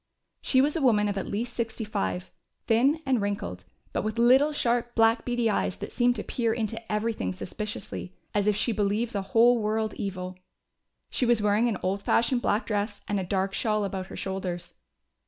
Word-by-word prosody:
She 260 Hz, -, +3 dB
was 290 Hz, +3 st, +1 dB
a 325 Hz, -, 0 dB
woman 215 Hz, -6 st, +4 dB
of 200 Hz, -, -1 dB
at 195 Hz, -, -3 dB
least 235 Hz, +4 st, -3 dB
sixty 225 Hz, -1 st, -3 dB
five, 95 Hz, -, -3 dB, 0.3 s
thin 270 Hz, +8 st, +3 dB
and 260 Hz, -4 st, +2 dB
wrinkled, 200 Hz, -, -3 dB, 0.3 s
but -, -, 0 dB
with 215 Hz, +2 st, -3 dB
little 260 Hz, +6 st, +5 dB
sharp 240 Hz, -4 st, 0 dB
black 225 Hz, 0 st, +4 dB
beady 240 Hz, -1 st, +1 dB
eyes 205 Hz, -3 st, 0 dB
that -, -, -7 dB
seemed 245 Hz, -1 st, +3 dB
to 210 Hz, -, -4 dB
peer 230 Hz, -2 st, 0 dB
into 225 Hz, 0 st, -3 dB
everything 210 Hz, -, -1 dB
suspiciously, 95 Hz, -, -6 dB, 0.2 s
as 205 Hz, 0 st, +1 dB
if 210 Hz, -, +3 dB
she 210 Hz, +4 st, +1 dB
believed 210 Hz, +2 st, 0 dB
the 200 Hz, -, -1 dB
whole 235 Hz, +4 st, +4 dB
world 215 Hz, 0 st, 0 dB
evil. 185 Hz, -2 st, -5 dB, 0.7 s
She 250 Hz, -, 0 dB
was 240 Hz, -2 st, +4 dB
wearing 210 Hz, +3 st, +3 dB
an 210 Hz, -, -1 dB
old 195 Hz, +2 st, 0 dB
fashioned 235 Hz, +4 st, +2 dB
black 210 Hz, 0 st, +1 dB
dress, 205 Hz, -1 st, -2 dB
and 205 Hz, -1 st, 0 dB
a -, -, -2 dB
dark 190 Hz, +1 st, -1 dB
shawl 215 Hz, 0 st, 0 dB
about 190 Hz, -1 st, -4 dB
her -, -, -9 dB
shoulders. 180 Hz, -2 st, -4 dB
215 Hz, 190 wpm, -27 LUFS, 195-235 Hz, 0.7 s, little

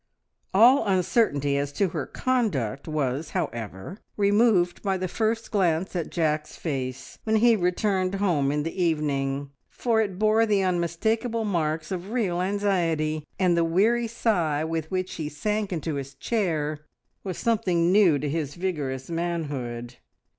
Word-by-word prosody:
All 240 Hz, +7 st, +6 dB
uncertainty 175 Hz, -, +2 dB
as 140 Hz, 0 st, -1 dB
to 190 Hz, +5 st, +1 dB
her 160 Hz, -4 st, -4 dB
conduct 170 Hz, -, -1 dB
was, 150 Hz, 0 st, -1 dB
however, 120 Hz, -, -5 dB, 0.2 s
removed 205 Hz, -3 st, +3 dB
by 195 Hz, -2 st, 0 dB
the 185 Hz, 0 st, -2 dB
first 225 Hz, +4 st, -1 dB
glance 185 Hz, -3 st, +1 dB
at 170 Hz, -3 st, -2 dB
Jack's 155 Hz, -2 st, -1 dB
face 130 Hz, -4 st, -5 dB
when 220 Hz, 0 st, +1 dB
he 230 Hz, +1 st, +5 dB
returned 185 Hz, 0 st, 0 dB
home 170 Hz, -9 st, +1 dB
in 150 Hz, 0 st, 0 dB
the 165 Hz, +3 st, -2 dB
evening, 140 Hz, -4 st, -1 dB, 0.2 s
for 230 Hz, -2 st, +1 dB
it 195 Hz, -4 st, -2 dB
bore 215 Hz, +2 st, +3 dB
the 205 Hz, -2 st, +2 dB
unmistakable 220 Hz, +7 st, 0 dB
marks 160 Hz, -4 st, -1 dB
of 185 Hz, +1 st, -4 dB
real 200 Hz, -7 st, 0 dB
anxiety, 170 Hz, -6 st, 0 dB
and 180 Hz, -2 st, +3 dB
the 170 Hz, -, +3 dB
weary 220 Hz, +8 st, +2 dB
sigh 175 Hz, -10 st, 0 dB
with 160 Hz, -1 st, -3 dB
which 185 Hz, 0 st, -2 dB
he 155 Hz, -3 st, -3 dB
sank 210 Hz, +7 st, -2 dB
into 160 Hz, -2 st, -2 dB
his 140 Hz, -1 st, -5 dB
chair 155 Hz, -6 st, -1 dB, 0.4 s
was 185 Hz, -4 st, -4 dB
something 185 Hz, -7 st, +1 dB
new 190 Hz, -7 st, +5 dB
to 145 Hz, -, -3 dB
his 145 Hz, -1 st, -2 dB
vigorous 145 Hz, -8 st, -3 dB
manhood. 145 Hz, -8 st, -3 dB
175 Hz, 145 wpm, -26 LUFS, 150-205 Hz, 0.4 s, All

